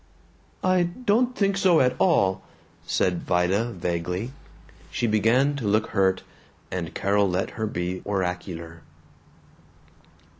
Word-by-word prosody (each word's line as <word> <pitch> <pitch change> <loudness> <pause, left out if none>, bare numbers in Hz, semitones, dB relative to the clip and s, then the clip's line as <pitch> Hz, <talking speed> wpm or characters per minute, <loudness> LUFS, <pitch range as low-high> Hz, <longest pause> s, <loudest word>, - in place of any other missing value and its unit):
"I 185 -1 +3
don't 240 +7 +1
think 200 -1 +1
so 185 -4 +4
at 125 0 +3
all," 150 - +3 0.5
said 90 -2 +1
Vida 90 +5 +1
vaguely. 90 0 -3 0.6
She - - -2
began 115 +6 +3
to 115 -7 -3
look 110 +2 +1
hurt, 95 -2 +2 0.5
and 85 -3 -4
Carol 100 0 +2
let 90 +2 -1
her 110 - -3
be 90 -2 -3
oracular. 90 -4 -4
100 Hz, 115 wpm, -25 LUFS, 90-140 Hz, 0.6 s, so